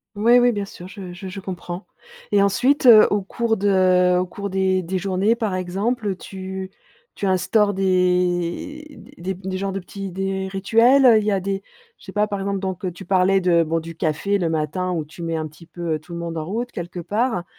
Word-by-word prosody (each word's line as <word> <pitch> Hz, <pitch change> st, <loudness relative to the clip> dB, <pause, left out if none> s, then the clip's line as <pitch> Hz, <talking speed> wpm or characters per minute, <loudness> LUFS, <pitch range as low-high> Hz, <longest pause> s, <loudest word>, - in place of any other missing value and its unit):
Oui 235 Hz, +4 st, +5 dB
oui, 245 Hz, 0 st, +4 dB
bien 205 Hz, -3 st, -3 dB
sûr, 180 Hz, -2 st, -11 dB
je 190 Hz, -3 st, -8 dB
je 185 Hz, +1 st, -8 dB
je 195 Hz, -, -7 dB
comprends 180 Hz, 0 st, -6 dB, 0.5 s
et 200 Hz, -, +5 dB
ensuite, 250 Hz, +8 st, +2 dB
heu, 220 Hz, -3 st, +9 dB
au 205 Hz, -1 st, +2 dB
cours 225 Hz, +3 st, -1 dB
de 185 Hz, -2 st, +3 dB
au 185 Hz, -, 0 dB
cours 200 Hz, +2 st, -6 dB
des 190 Hz, -1 st, +1 dB
des 185 Hz, +3 st, -2 dB
journées, 195 Hz, +4 st, +1 dB
par 210 Hz, -5 st, -1 dB
exemple, 200 Hz, +6 st, -2 dB
heu, 185 Hz, -, -3 dB
tu 190 Hz, 0 st, -7 dB, 0.5 s
tu -, -, -3 dB
instaures 200 Hz, +3 st, +2 dB
des 180 Hz, -, 0 dB, 0.2 s
des 185 Hz, +2 st, -4 dB
des 190 Hz, 0 st, -5 dB
genres 195 Hz, 0 st, -2 dB
de 195 Hz, -, -3 dB
petits 195 Hz, +1 st, -7 dB
des 190 Hz, +1 st, -3 dB
rituels, 230 Hz, +8 st, +4 dB
heu, 230 Hz, -3 st, +8 dB
il 215 Hz, -, +1 dB
y 210 Hz, -, +1 dB
a 195 Hz, -, +1 dB
des 195 Hz, +1 st, -3 dB, 0.3 s
je -, -, -22 dB
sais 190 Hz, -, -9 dB
pas, 210 Hz, +1 st, +1 dB
par 200 Hz, -2 st, -3 dB
exemple, 195 Hz, 0 st, -2 dB
donc 190 Hz, -1 st, -4 dB
heu, 185 Hz, -, -1 dB
tu 180 Hz, +2 st, -11 dB
parlais 190 Hz, +1 st, +3 dB
de 175 Hz, -2 st, +3 dB
bon, 165 Hz, +1 st, -1 dB
du 165 Hz, 0 st, -9 dB
café 165 Hz, +6 st, 0 dB
le 170 Hz, -3 st, -1 dB
matin 165 Hz, +4 st, -1 dB
où 160 Hz, -4 st, -2 dB
tu 160 Hz, +3 st, -12 dB
mets 165 Hz, -1 st, -2 dB
un 155 Hz, 0 st, -3 dB
petit 155 Hz, +3 st, -16 dB
peu, 170 Hz, -1 st, -4 dB
heu, 155 Hz, -, -2 dB
tout 170 Hz, +3 st, -16 dB
le 170 Hz, -, -5 dB
monde 165 Hz, -1 st, -4 dB
en 155 Hz, -, -2 dB
route 230 Hz, +8 st, -4 dB
quelque 175 Hz, 0 st, -6 dB
part, 210 Hz, 0 st, -1 dB
190 Hz, 230 wpm, -22 LUFS, 180-205 Hz, 0.5 s, heu